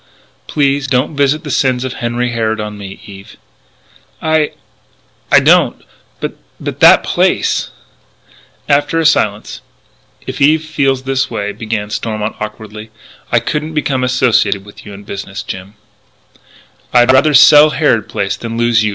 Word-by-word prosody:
"Please 140 -2 0
don't 130 +2 0
visit 145 +2 +1
the 145 - -6
sins 130 -2 +1
of 130 -1 -4
Henry 120 0 -2
Harrod 110 -1 -1
on 105 0 -5
me, 100 -1 -9
Eve." 100 -2 -13 0.8
"I 155 -1 +1 0.9
don't. - - +3 0.4
But - - -5 0.2
but - - -6
that - - +7
place - - 0 0.5
" - - -31
After 145 +3 -3
a 165 - 0
silence: 110 -5 0 0.6
"If 130 +2 -6
Eve 155 +3 +3
feels 135 -4 -1
that 135 0 -1
way," 105 -3 -3
began 110 -2 -4
Stormont 110 0 -3
awkwardly, 105 0 -8 0.4
"I - - +4
couldn't 155 +1 -4
become 135 -4 -1
associated 125 -6 +1
with 105 +1 -14
you 105 - -9
in 100 - -12
business, 100 0 -7
Jim 95 +2 -8 0.6
" - - -30
"I'd 120 +1 +6
rather 145 +3 +4
sell 150 +2 +8
Harrod 140 -8 0
Place 100 0 -2
than 115 -1 -6
lose 120 -1 +2
you!" 105 - +1
120 Hz, 150 wpm, -14 LUFS, 105-140 Hz, 0.9 s, sell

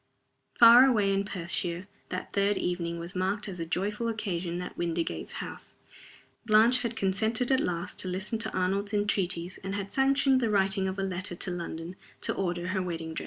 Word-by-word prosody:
Far 240 +3 +9
away 210 -6 +2
in 195 +1 0
Perthshire 175 -1 -3 0.2
that - - -5
third 200 0 +2
evening 170 -1 -2
was 170 +2 -7
marked 195 +3 -1
as 185 -3 -7
a 165 - -4
joyful 205 +7 -2
occasion 180 -6 -3
at 180 - -6
Windygates 170 -1 -2
House. - - -7 0.7
Blanche 230 +3 +5
had 235 -1 -3
consented 220 +5 0
at 265 - +4
last 175 0 -3
to - - +2
listen 190 +5 -2
to 220 -1 -2
Arnold's 195 +3 -1
entreaties, 185 -3 0
and 195 +1 -3
had 200 -1 -4
sanctioned 270 0 +3
the 230 - +1
writing 195 -1 +2
of 190 +1 -4
a 195 - -1
letter 185 -1 -3
to 180 - -2
London 170 0 -5 0.3
to - - 0
order 175 -1 -2
her 190 0 0
wedding 165 -3 -4
dress. - - -3
195 Hz, 185 wpm, -28 LUFS, 175-215 Hz, 0.7 s, Far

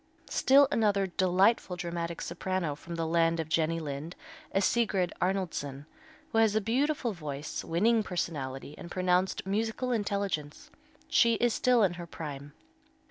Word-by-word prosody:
Still 275 +1 +5
another 205 -3 +2
delightful 185 +2 +2
dramatic 170 -1 -4
soprano 175 -2 -2
from 170 +4 -8
the 165 -1 -1
land 165 0 +2
of 160 - -2
Jenny 165 +1 +1
Lind 150 +2 -5 0.4
is 195 0 +2
Sigrid 205 -6 +1
Arnoldson, 165 -7 -2 0.5
who 225 - +2
has 220 -2 +4
a - - +4
beautiful 245 +3 0
voice, 150 -4 -5
winning 220 +7 +2
personality, 145 -8 -4
and 170 - -8
pronounced 185 +1 +1
musical 225 +5 -1
intelligence. 200 -9 -2 0.4
She 230 -1 +4
is 240 0 +2
still 250 -3 +3
in 185 -3 +2
her 170 - -8
prime. 145 -3 -7
180 Hz, 140 wpm, -30 LUFS, 165-215 Hz, 0.5 s, Still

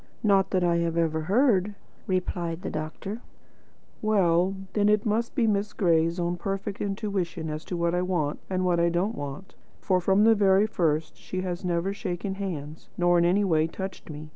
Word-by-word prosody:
"Not 195 -3 +3
that 185 -2 +1
I 170 -1 +2
have 170 -1 -1
ever 160 -1 +1
heard," 205 - +2 0.3
replied 180 -2 -2
the - - -3
doctor. 160 +8 -5 0.8
"Well, 190 -3 +2 0.2
then, 210 -1 +3
it 210 +1 +2
must 225 +2 +1
have - - -35
been 225 -6 +3
Miss 200 +1 -2
Gray's 165 -1 +2
own 175 0 -1
perfect 195 +2 -4
intuition 195 -6 -2
as 155 +1 -5
to 180 - -4
what 170 0 0
I 180 - +1
want, 175 -5 -1
and 185 -1 0
what 175 -1 +2
I 170 0 +3
don't 180 +6 0
want. 145 +1 -7 0.3
For 185 -2 +1
from 195 +3 +3
the 225 +1 +6
very 200 -1 +4
first 160 -7 -1
she 185 - -5
has 180 0 -4
never 180 +2 0
shaken 190 0 -4
hands, 160 -6 -6
nor 175 0 +4
in 170 - +3
any 190 +4 +3
way 160 -4 +2
touched 190 +2 -7
me. 150 0 -8
180 Hz, 190 wpm, -26 LUFS, 170-200 Hz, 0.8 s, the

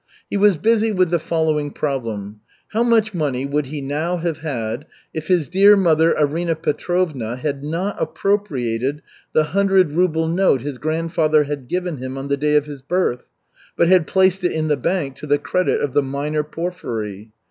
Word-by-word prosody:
He - - -1
was 200 -3 +4
busy 225 +4 +2
with 185 -4 +1
the 170 - +2
following 155 -2 0
problem: 115 -9 -4 0.3
How 220 - 0
much 225 -3 +3
money 140 -6 -1
would 140 0 -1
he 145 +1 -5
now 155 +6 -2
have 165 -2 -3
had, 130 -2 -4 0.3
if 155 -1 -5
his 175 -6 +2
dear 200 +3 +6
mother 165 -3 +3
Arina 160 +3 +1
Petrovna 155 -6 -1
had 140 +2 -3
not 170 +7 -2
appropriated 140 - -1 0.3
the 155 - +4
hundred 195 -4 +3
ruble 160 -1 +1
note 170 -6 +2
his 140 -1 -5
grandfather 155 -1 +1
had 140 -3 -5
given 180 0 -2
him 130 +1 -6
on 135 +1 -5
the 140 - +1
day 150 +1 +1
of 150 -1 +3
his 145 -2 -9
birth, 140 -4 -1 0.5
but 170 - +3
had 180 -4 +4
placed 190 0 +2
it 175 - +2
in 155 -1 -1
the 150 - +3
bank 140 -1 -2
to 150 - -8
the 145 0 +3
credit 180 +4 0
of 140 -3 -2
the 145 - +4
minor 145 +3 -2
Porfiry? 115 - -5
155 Hz, 180 wpm, -20 LUFS, 140-180 Hz, 0.5 s, dear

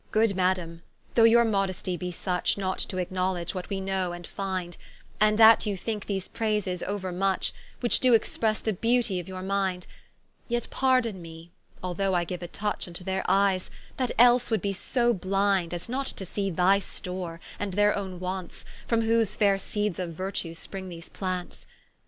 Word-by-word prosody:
Good 215 -2 +3
Madame, 180 -3 0 0.3
though 230 - +6
your 235 +1 +6
modestie 195 -4 0
be 180 +1 -4
such, 180 +2 0
Not 190 -1 -2
to 185 - -3
acknowledge 185 -1 -1
what 185 -1 -5
we 195 -1 -2
know 190 -2 -1
and 175 0 -8
find; 185 -3 -4 0.4
And 215 0 +4
that 225 0 +7
you 200 -2 -1
think 210 +2 -4
these 195 -2 -2
prayses 210 -5 -1
ouermuch, 190 -1 -1 0.3
Which 240 - +3
doe 255 -2 +4
expresse 220 -1 +1
the 220 - 0
beautie 230 -1 +2
of 175 - -7
your 185 -1 -6
mind; 190 -2 -1 0.6
Yet 240 0 0
pardon 255 -7 +2
me 165 0 -11 0.3
although 185 +1 0
I 175 -1 +1
giue 180 +1 -5
a 175 - -5
touch 210 +3 -3
Vnto 175 +1 -8
their 190 0 -1
eyes, 195 -2 +2 0.3
that 255 -2 0
else 245 +1 +6
would 220 -5 0
be 200 -1 0
so 240 +5 +1
blind, 195 -2 +1
As 175 0 -5
not 265 +3 -2
to 190 - -3
see 195 +2 -2
thy 185 +3 +4
store, 180 -3 -6 0.2
and 200 -3 -3
their 205 0 +4
owne 190 -3 -4
wants, 185 0 -5 0.2
From 230 -1 +2
whose 225 -2 +2
faire 200 -2 +3
seeds 205 -1 -2
of 175 -2 -3
Virtue 185 -1 -3
spring 190 +2 -7
these 170 -1 -9
plants. 185 -2 -4
190 Hz, 180 wpm, -27 LUFS, 180-210 Hz, 0.6 s, that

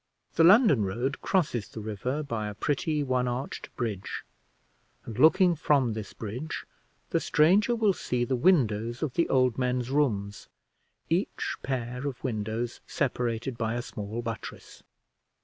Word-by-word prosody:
The 165 - +4
London 185 - +6
road 120 +8 -2
crosses 145 - 0
the - - -9
river 110 +7 -3
by 115 -7 -3
a 105 - -6
pretty 150 +5 0
one 130 -2 0
arched 125 +2 -4
bridge, 105 -6 -4 0.8
and, 115 0 -7
looking 170 +5 +6
from 140 -6 +2
this 105 -2 -6
bridge, 120 +8 -5 0.5
the - - +2
stranger 195 +10 +3
will 215 -4 +3
see 125 -7 -1
the 130 - 0
windows 120 - +2
of 145 -5 -2
the 170 - +1
old 130 -2 +2
men's 125 0 0
rooms, 105 -9 0 0.6
each - - -1
pair 125 +1 -3
of 135 -4 -6
windows 115 -1 -3
separated 120 -2 -2
by 115 0 -1
a 120 - -2
small 110 +2 -5
buttress. 115 -2 -7
125 Hz, 145 wpm, -28 LUFS, 110-145 Hz, 0.8 s, London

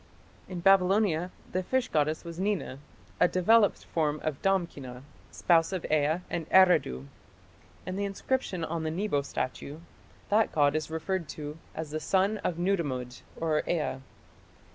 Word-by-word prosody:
In 180 -2 -5
Babylonia 190 -2 +3 0.2
the 185 - 0
fish 260 +7 0
goddess 155 +1 0
was 170 0 -8
Nina, 190 -9 -2 0.4
a - - +6
developed 205 +4 +3
form 155 -2 -1
of 155 -4 -3
Damkina, 145 -10 -1 0.3
spouse 165 -1 +2
of 185 -3 -3
Ea 155 +3 +2
of 165 -1 -3
Eridu. 180 - +4 0.8
In 185 +1 -4
the 200 - -1
inscription 195 -2 -2
on 165 0 -3
the 160 - -2
Nebo 170 -3 0
statue, 140 +1 -4 0.5
that 215 +2 +3
god 145 -1 +3
is 155 -1 -2
referred 160 +1 -3
to 150 -1 -6 0.2
as 160 -2 -5
the 155 - -2
"son 195 +6 +1
of 170 - -2
Nudimmud" 145 -10 -1 0.5
(Ea). 155 -6 -1
170 Hz, 140 wpm, -29 LUFS, 150-190 Hz, 0.8 s, a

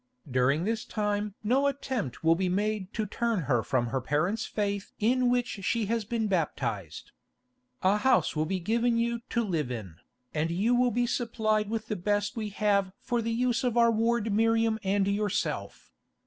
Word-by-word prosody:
During 130 +5 +2
this 225 +3 -1
time 210 -1 -2
no 260 +6 +3
attempt 260 - -3
will 165 0 +5
be 185 +2 0
made 205 +1 -1
to 220 - 0
turn 230 0 -1
her 130 -5 +1
from 120 +2 0
her 130 +2 -1
parents' 175 - 0
faith 200 -2 -2
in 245 +3 +2
which 245 -3 0
she 230 +3 +1
has 225 +1 -1
been 225 +1 -1
baptised. 115 - -2 0.7
A 195 +3 +4
house 205 -9 +2
will 155 +1 0
be 190 +2 -1
given 230 +6 +1
you 235 0 0
to 235 - +1
live 165 - -1
in, 105 -9 -6 0.4
and 155 +1 0
you 200 +8 +1
will 245 0 +4
be 245 +1 +1
supplied 215 -3 0
with 220 0 -2
the 215 - -2
best 205 +3 -1
we 215 -2 -3
have 200 -2 +1
for 240 -1 -1
the 230 - -2
use 240 +1 +1
of 245 -2 0
our 235 0 +5
ward 225 -1 +1
Miriam 225 0 +2
and 195 0 +1
yourself. 205 0 -2
210 Hz, 180 wpm, -28 LUFS, 185-230 Hz, 0.7 s, will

